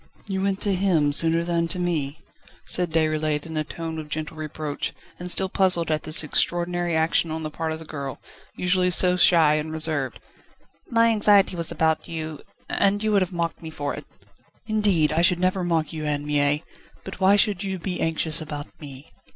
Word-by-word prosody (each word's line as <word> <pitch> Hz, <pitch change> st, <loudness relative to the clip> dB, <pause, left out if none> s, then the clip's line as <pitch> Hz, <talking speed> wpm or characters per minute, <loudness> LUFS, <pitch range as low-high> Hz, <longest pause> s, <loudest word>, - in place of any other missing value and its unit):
"You 190 Hz, -1 st, -2 dB
went 195 Hz, 0 st, 0 dB
to 205 Hz, -, +2 dB
him 180 Hz, -6 st, +2 dB
sooner 165 Hz, +3 st, +3 dB
than 170 Hz, -1 st, 0 dB
to 175 Hz, -, +3 dB
me?" 160 Hz, -5 st, -2 dB, 0.5 s
said 180 Hz, -1 st, +4 dB
Déroulède 155 Hz, -2 st, 0 dB
in 160 Hz, -1 st, -7 dB
a 155 Hz, -, 0 dB
tone 160 Hz, +1 st, -6 dB
of 155 Hz, -1 st, -8 dB
gentle 155 Hz, +1 st, -4 dB
reproach, 155 Hz, -1 st, -4 dB, 0.3 s
and 180 Hz, 0 st, -5 dB
still 190 Hz, +1 st, +3 dB
puzzled 180 Hz, -4 st, +1 dB
at 155 Hz, -, 0 dB
this 155 Hz, 0 st, -1 dB
extraordinary 175 Hz, +2 st, 0 dB
action 160 Hz, +1 st, +1 dB
on 160 Hz, 0 st, -4 dB
the 155 Hz, -, -4 dB
part 160 Hz, +1 st, -3 dB
of 160 Hz, -, -3 dB
the 160 Hz, -, -11 dB
girl, 140 Hz, -3 st, -6 dB, 0.4 s
usually 180 Hz, 0 st, +1 dB
so 180 Hz, 0 st, +3 dB
shy 165 Hz, -4 st, +5 dB
and 155 Hz, +1 st, -4 dB
reserved. 155 Hz, -5 st, -1 dB, 0.7 s
"My 230 Hz, 0 st, +4 dB
anxiety 205 Hz, -3 st, +4 dB
was 170 Hz, -1 st, 0 dB
about 160 Hz, -1 st, 0 dB
you, 160 Hz, -2 st, -6 dB, 0.3 s
and 200 Hz, +1 st, +1 dB
you 215 Hz, -, +1 dB
would 200 Hz, -2 st, +3 dB
have 185 Hz, -, -1 dB
mocked 170 Hz, -3 st, -3 dB
me 160 Hz, -, -7 dB
for 145 Hz, -2 st, -4 dB
it." -, -, -9 dB, 0.6 s
"Indeed, 205 Hz, -8 st, +2 dB
I 160 Hz, +2 st, +1 dB
should 175 Hz, 0 st, +3 dB
never 185 Hz, +1 st, 0 dB
mock 165 Hz, -3 st, -1 dB
you, 155 Hz, -1 st, -5 dB
Anne 145 Hz, -1 st, -2 dB
Mie. 145 Hz, 0 st, +1 dB, 0.4 s
But 195 Hz, -, -9 dB
why 190 Hz, +1 st, +5 dB
should 205 Hz, -2 st, +3 dB
you 190 Hz, -1 st, -3 dB
be 180 Hz, +1 st, -4 dB
anxious 160 Hz, 0 st, +1 dB
about 150 Hz, -1 st, -8 dB
me?" 140 Hz, -1 st, -11 dB
165 Hz, 195 wpm, -24 LUFS, 155-180 Hz, 0.7 s, shy